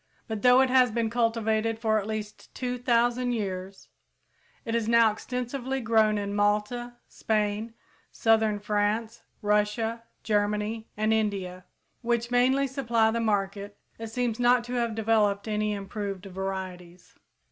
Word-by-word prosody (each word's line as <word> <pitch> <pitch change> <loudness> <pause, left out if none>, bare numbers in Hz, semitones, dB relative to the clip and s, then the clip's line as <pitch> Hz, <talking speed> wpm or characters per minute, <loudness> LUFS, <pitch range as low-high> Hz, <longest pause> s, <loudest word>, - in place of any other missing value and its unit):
But 220 -3 -4
though 250 +2 +6
it 260 -1 +2
has 255 -1 +5
been 225 0 -1
cultivated 225 -1 0
for 220 -1 +1
at 205 - -6
least 215 -1 -6
two 250 -1 -3
thousand 245 +1 +1
years 190 -3 -5 0.8
and 230 - -2
is 230 -1 0
now 230 -1 +5
extensively 250 +4 -4
grown 220 -3 +3
in 200 0 -3
Malta, 210 +4 0
Spain, 215 +1 -2 0.4
southern 220 -2 +2
France, 210 +2 -1 0.2
Russia, 210 +2 0 0.2
Germany 210 +1 -1
and 215 +1 +2
India, 195 -4 -2 0.4
which 235 0 -1
mainly 260 +3 +3
supply 235 -5 +1
the 230 - -1
market, 205 -2 -1 0.2
it 225 - -5
seems 235 0 -2
not 245 0 +4
to 245 +1 -7
have 235 -3 -1
developed 215 -2 +1
any 210 0 0
improved 200 -1 -5
varieties. 185 -2 -6
220 Hz, 135 wpm, -27 LUFS, 205-235 Hz, 0.8 s, though